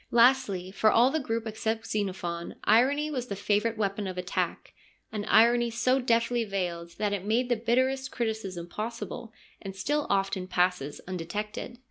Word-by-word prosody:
Lastly, 235 -7 +3
for 215 +2 +3
all 245 +3 +5
the 315 - +1
group 230 -4 -2
except 220 0 -2
Xenophon, 185 -5 -3
irony 275 +8 +3
was 250 -4 -3
the 200 - -4
favourite 210 +3 0
weapon 200 -1 -1
of 185 -1 -5
attack, 180 0 -2 0.4
an 210 -1 -3
irony 235 +2 +5
so 245 +3 +2
deftly 235 0 +2
veiled 175 -5 -4
that 210 -1 0
it 195 -2 -2
made 235 +5 +1
the 240 - +3
bitterest 260 +4 +1
criticism 215 -7 -3
possible, 230 +3 -5 0.3
and 195 -1 -7
still 295 +8 -1
often 195 -1 0
passes 180 -5 0
undetected. 205 +6 -5
220 Hz, 155 wpm, -28 LUFS, 195-240 Hz, 0.4 s, all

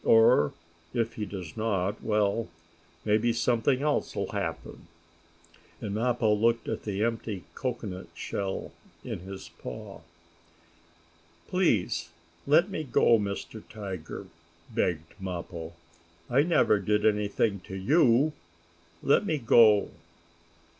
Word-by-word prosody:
Or, 115 - +5 0.4
if 115 -1 0
he 105 -2 -4
does 90 -5 -7
not, 105 -3 -1
well, 105 +1 +1 0.6
maybe 110 +2 +3
something 120 +3 +1
else 150 -1 0
will - - -2
happen," - - -5 0.9
and 100 - -4
Mappo 115 0 +2
looked 115 +2 +2
at - - -3
the 105 0 -1
empty 115 -5 -2
cocoanut 115 -8 -4
shell 95 -1 -4 0.3
in - - -5
his 95 +2 -9
paw. 60 - -8 1.5
"Please 115 - +1 0.4
let 170 +7 +4
me 155 - -3
go, 120 -4 +4
Mr. 100 +2 -4
Tiger!" 95 -6 -6 0.5
begged 80 -3 -1
Mappo. 85 -3 -6 0.6
"I 130 +3 +5
never 155 -9 +3
did 105 +2 +1
anything 105 -1 +1
to 95 - -6
you. 130 - +4 0.7
Let 140 - +4
me 160 -6 0
go!" 115 -5 +5
110 Hz, 115 wpm, -28 LUFS, 100-120 Hz, 1.5 s, Or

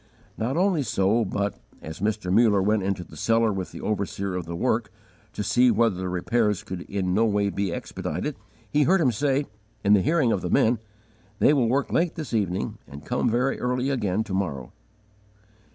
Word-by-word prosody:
_ - - -33 0.3
Not 125 +7 -2
only 180 -3 +2
so, 110 -1 +1
but, 100 0 -2 0.2
as 80 +2 -8
Mr. 105 -2 -1
Muller 110 -2 +5
went 105 +1 +2
into 95 -1 -2
the 80 - -15
cellar 115 +5 +2
with 95 -2 -4
the - - -9
overseer 100 -2 -2
of 90 -2 -4
the 85 - -4
work, - - 0 0.4
to 105 - -3
see 125 +4 +4
whether 115 -2 +3
the 95 0 -3
repairs 105 +3 0
could 95 -4 -6
in 95 -2 -1
no 110 +4 +3
way 100 -2 +1
be 100 -2 -2
expedited, - - -4 0.3
he 150 - +1
heard 185 +7 +4
him 135 -7 +3
say, 140 +4 0 0.4
in 100 0 +5
the 100 - +5
hearing 150 - +2
of 95 - 0
the 90 - -3
men, 115 +5 +3 0.6
"they 145 - +5
will 125 -6 +2
work 140 +3 0
late 170 0 +1
this 155 -6 -6
evening, 95 -5 -1
and 70 0 -11
come - - 0
very 125 +4 0
early 125 +2 0
again 105 -5 0
to 100 - -7
morrow." 75 -10 -3
105 Hz, 200 wpm, -25 LUFS, 95-125 Hz, 0.6 s, Muller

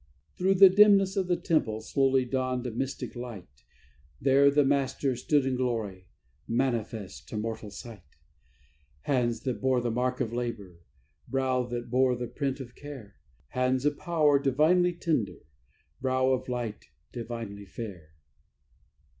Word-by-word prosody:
Through 190 +2 +2
the 195 +1 +10
dimness 195 0 +5
of 190 -2 0
the 180 -1 +1
temple 110 -10 0
slowly 135 +2 +2
dawned 130 0 -2
a 125 - -2
mystic 130 +4 -4
light; 115 - -9 0.6
There 140 +2 +5
the 145 0 +3
Master 135 -1 +1
stood 140 +3 +1
in 130 -1 0
glory, 110 -7 -3 0.4
manifest 115 - -2
to - - -5
mortal 110 -1 -4
sight: 105 0 -10 1.0
Hands 120 - 0
that 125 -6 -3
bore 130 -1 +2
the 120 -1 -1
mark 125 +2 -1
of 115 - -2
labour, 105 -8 -5 0.5
brow 130 -2 0
that 120 -1 -5
bore 130 0 +3
the 120 0 -4
print 135 +2 -3
of 125 -3 -8
care; 130 - -10 0.3
Hands 130 +1 0
of 150 -1 +1
power, 150 -4 +3
divinely 155 +7 +3
tender; 155 - -2 0.6
brow 130 0 +2
of 130 0 -1
light, 120 - -4 0.2
divinely 115 -4 -6
fair. 90 -9 -9
125 Hz, 140 wpm, -28 LUFS, 115-140 Hz, 1.0 s, the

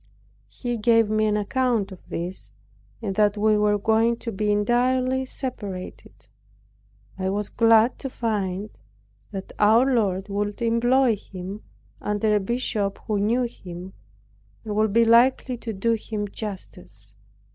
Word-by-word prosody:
He 240 - -4
gave 225 -1 +3
me 215 0 +2
an 210 0 +1
account 230 -1 0
of 185 - -13
this, 170 - -5 0.5
and 195 - -2
that 210 -1 +3
we 215 +1 +3
were 210 0 +2
going 225 +3 +2
to 230 - -5
be 210 +1 0
entirely 255 +5 +1
separated. 205 -9 -7 0.9
I 190 0 -1
was 205 +1 -2
glad 230 +1 +4
to 270 - -4
find 210 -4 -2 0.6
that 195 -2 -7
our 220 +4 +5
Lord 195 -5 0
would 205 0 -3
employ 235 +1 +3
him, 195 +2 -8 0.4
under 210 +1 0
a - - +3
bishop 205 -2 -2
who 210 -2 0
knew 230 +5 +2
him, 185 -5 -8 0.7
and 210 -1 -3
would 215 0 +2
be 230 +2 +4
likely 245 +2 +4
to 230 0 -5
do 220 +3 0
him 215 -2 -3
justice. 105 - -9
215 Hz, 140 wpm, -24 LUFS, 200-235 Hz, 0.9 s, our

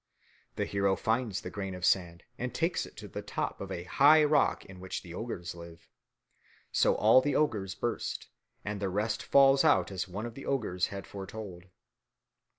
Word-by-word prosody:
The - - -1
hero 100 -1 +1
finds 110 -2 -1
the - - -7
grain 95 -2 -5
of 90 0 -3
sand 85 -2 +1 0.2
and 125 0 -4
takes 165 +1 0
it - - -18
to - - -8
the - - -6
top - - -4
of 100 - -5
the 90 -2 -4
high 145 - +6
rock 150 -1 +2
in 95 -1 -12
which 95 0 -5
the 85 -3 -10
ogres 90 -4 -5
live. 85 -1 -12 0.8
So - - +3
all 115 +4 +6
the 145 +2 -1
ogres 105 -10 0
burst 120 - -3 0.4
and 105 0 -3
the 100 -1 -1
rest 105 +4 -1
falls 135 0 +5
out - - +3
as 95 -1 -3
one 100 +5 -5
of 120 - -6
the 135 - -9
ogres 105 -10 0
had 100 0 -7
foretold. 95 -2 -8
100 Hz, 185 wpm, -30 LUFS, 90-120 Hz, 0.8 s, high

